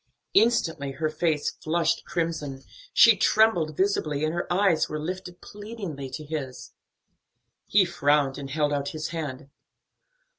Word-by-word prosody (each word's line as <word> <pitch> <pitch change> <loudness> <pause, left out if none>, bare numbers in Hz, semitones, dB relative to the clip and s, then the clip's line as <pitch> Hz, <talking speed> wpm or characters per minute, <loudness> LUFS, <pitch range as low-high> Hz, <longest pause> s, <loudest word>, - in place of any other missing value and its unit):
Instantly 165 - +2
her 155 +2 -2
face 155 -1 0
flushed 165 +1 -1
crimson, 155 -5 -3 0.3
she 230 -2 +7
trembled 180 -7 +2
visibly, 155 -7 0
and 155 - -1
her 175 +1 -3
eyes 180 -3 +2
were 155 - -3
lifted 180 +3 -6
pleadingly 205 - -7
to 135 +4 -7
his. 145 -4 -6 0.9
He 200 -2 +4
frowned 145 -5 +1
and 135 -1 -7
held 150 0 0
out 140 -1 -1
his 155 - -4
hand. 140 -4 -6
155 Hz, 135 wpm, -26 LUFS, 145-180 Hz, 0.9 s, she